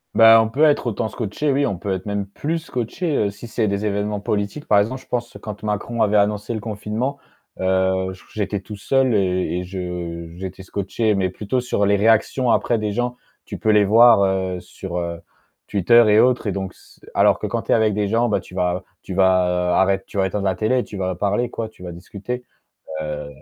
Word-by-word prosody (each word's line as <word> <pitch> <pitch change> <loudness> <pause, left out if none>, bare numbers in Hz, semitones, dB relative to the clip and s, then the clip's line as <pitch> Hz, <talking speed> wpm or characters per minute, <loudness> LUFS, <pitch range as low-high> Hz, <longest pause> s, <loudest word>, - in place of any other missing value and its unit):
Ben, 115 0 +8
on 110 - -1
peut 140 +7 +1
être 145 -4 +2
autant 110 0 -1
scotché, 115 +7 -2
oui, 140 +1 +2
on 100 - -2
peut 95 +2 -3
être 95 - -5
même, 100 -1 -2
plus 155 +11 -3
scotché 150 +3 -3
heu, 100 - +1
si 105 +4 -10
c'est 110 -2 0
des 100 +1 -2
évènements 105 0 -1
politiques. 105 +8 -3
Par 105 - +4
exemple, 130 +6 -1
je - - -22
pense, 120 -1 -3
quand 105 -1 -8
Macron 110 +2 -2
avait 105 0 +3
annoncé 105 +2 +1
le 110 - -3
confinement, 110 +6 -3 0.4
heu, 95 0 +1
j 95 - -12
j'étais 105 -1 -2
tout 105 +2 -9
seul 130 +5 +1
et 90 -2 0
et - - -4
je 90 -2 -5
j'étais 95 0 -7
scotché 100 +3 -1
mais 95 -1 0
plutôt 105 +7 -2
sur 120 -4 0
les 100 +1 +3
réactions, 115 +3 +3
après 120 - +2
des 105 -1 -2
gens 120 +2 -1 0.3
tu - - -7
peux 110 - -1
les 105 -1 +5
voir 115 +1 +7
heu, 95 -1 -1
sur 90 0 -7
heu, 85 -1 -4 0.5
Twitter 115 +5 +5
et 105 - +6
autres 125 -1 +3
et 100 - +1
donc 95 -1 -4
s - - -21 0.2
alors - - +4
que - - -3
quand - - -2
tu - - -3
es - - +6
avec 110 -2 +2
des 105 0 0
gens, 115 +2 +2
bah 105 - +1
tu - - -16
vas 90 0 0 0.2
tu 95 - -6
vas 90 -1 +2
arrête 95 0 +2
tu - - -8
vas 95 -1 +2
éteindre 100 +2 -3
la 95 - +1
télé, 120 +6 +1
tu 105 - -10
vas 95 -1 -2
parler 105 +6 0
quoi, 115 -2 -4
tu 110 -4 -16
vas 90 - -6
discuter 105 +8 -6 0.6
heu, 75 -1 -5
105 Hz, 225 wpm, -21 LUFS, 95-115 Hz, 0.6 s, Ben